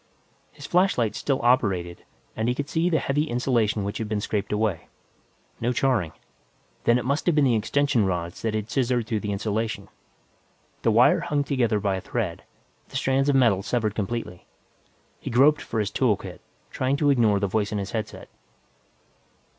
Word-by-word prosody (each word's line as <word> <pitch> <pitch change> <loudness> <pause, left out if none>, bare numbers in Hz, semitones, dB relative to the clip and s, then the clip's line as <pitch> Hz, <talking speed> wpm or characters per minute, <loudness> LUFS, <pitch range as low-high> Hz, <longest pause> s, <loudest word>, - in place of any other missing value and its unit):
His 145 - -11
flashlight 175 - +2
still 135 -2 -1
operated, 95 -8 +1 0.3
and 110 +1 -1
he 125 - 0
could 145 +1 -3
see 165 +3 0
the 165 - +2
heavy 145 +1 0
insulation 120 -5 0
which 100 +1 -4
had 110 -2 -4
been 105 -1 -1
scraped 105 0 -3
away. 105 -4 -1 0.7
No 120 +2 0
charring; 125 - +1 0.7
then 120 - +5
it 125 - -3
must 140 +6 -1
have 175 - +3
been 150 -2 +4
the 125 - +3
extension 125 +2 +1
rods 85 -2 -3
that 110 -1 -1
had 110 +1 -4
scissored 125 -3 +1
through 110 -2 -1
the 105 0 -4
insulation. 110 +2 -3 0.9
The - - +2
wire - - +5
hung 145 -1 -1
together 120 -7 +1
by 100 -2 0
a - - -6
thread, - - -3 0.5
the - - -13
strands 135 +1 +1
of 140 - +3
metal 115 -8 +4
severed 110 -1 -1
completely. 105 -3 -4 0.7
He - - -6
groped 145 +5 +4
for 110 - -3
his 100 -2 -1
tool 115 -7 +2
kit, 95 -3 -10 0.3
trying 130 +2 0
to 145 -1 +3
ignore 110 -6 +3
the 100 - 0
voice 105 +1 -1
in 105 - -2
his 100 0 -4
headset. 110 -1 -5
115 Hz, 180 wpm, -25 LUFS, 105-135 Hz, 0.9 s, then